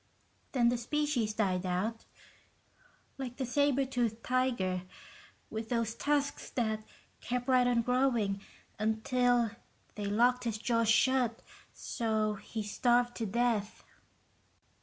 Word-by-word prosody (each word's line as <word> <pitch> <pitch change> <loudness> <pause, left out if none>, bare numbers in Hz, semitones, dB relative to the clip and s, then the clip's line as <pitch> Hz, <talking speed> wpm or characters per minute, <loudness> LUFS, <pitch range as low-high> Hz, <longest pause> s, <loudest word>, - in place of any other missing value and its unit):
"Then 240 -3 +4
the 240 0 0
species 245 -4 0
died 190 -4 +1
out, 190 +5 -2 1.1
like 250 -2 -5
the 265 - -1
saber 275 +1 +2
tooth 235 -4 -1
tiger, 240 -8 0 0.7
with 220 0 -4
those 230 -2 0
tusks 285 +1 -1
that 220 -3 -1 0.4
kept 245 +1 -3
right 255 -1 +4
on 240 -1 +2
growing 240 -6 +1 0.4
until 235 +2 +2 0.4
they 210 - -5
locked 245 +4 +2
his 225 -2 -1
jaws 230 0 +1
shut, 250 0 +3 0.3
so 220 -2 -1
he 215 +2 -6
starved 240 +3 +2
to 225 - -2
death." 225 -1 0
235 Hz, 115 wpm, -32 LUFS, 220-250 Hz, 1.1 s, Then